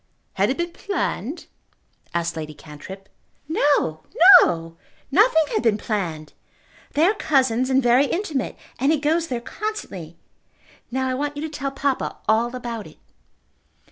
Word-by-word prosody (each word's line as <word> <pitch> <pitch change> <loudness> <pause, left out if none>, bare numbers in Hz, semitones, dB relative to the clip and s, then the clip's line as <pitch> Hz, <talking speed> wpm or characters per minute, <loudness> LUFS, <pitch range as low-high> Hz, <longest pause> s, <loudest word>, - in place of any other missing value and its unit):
"Had 195 +3 +1
it 265 - -1
been 345 0 -2
planned?" 335 - -3 0.7
asked 170 0 -2
Lady 155 -1 -6
Cantrip. 175 +7 -11 0.4
"No; 285 - +1 0.4
no! 165 -1 -1 0.4
Nothing 360 - +5
had - - +1
been 225 -3 +2
planned. 170 -9 -4 0.6
They 305 +3 +3
are 395 - +4
cousins 260 - +1
and 265 0 +3
very 245 +4 +4
intimate, 325 -7 -2 0.2
and 275 +3 +3
he 320 - +3
goes 320 +3 +1
there 245 -4 -3
constantly. 195 - -6 0.7
Now 260 +1 -1
I 260 - -1
want 290 +2 -3
you 290 - -4
to 315 - -3
tell 280 -2 -4
papa 275 -1 -2
all 230 +3 +2
about 235 -5 -5
it." 155 - -17
255 Hz, 145 wpm, -22 LUFS, 195-295 Hz, 0.7 s, Nothing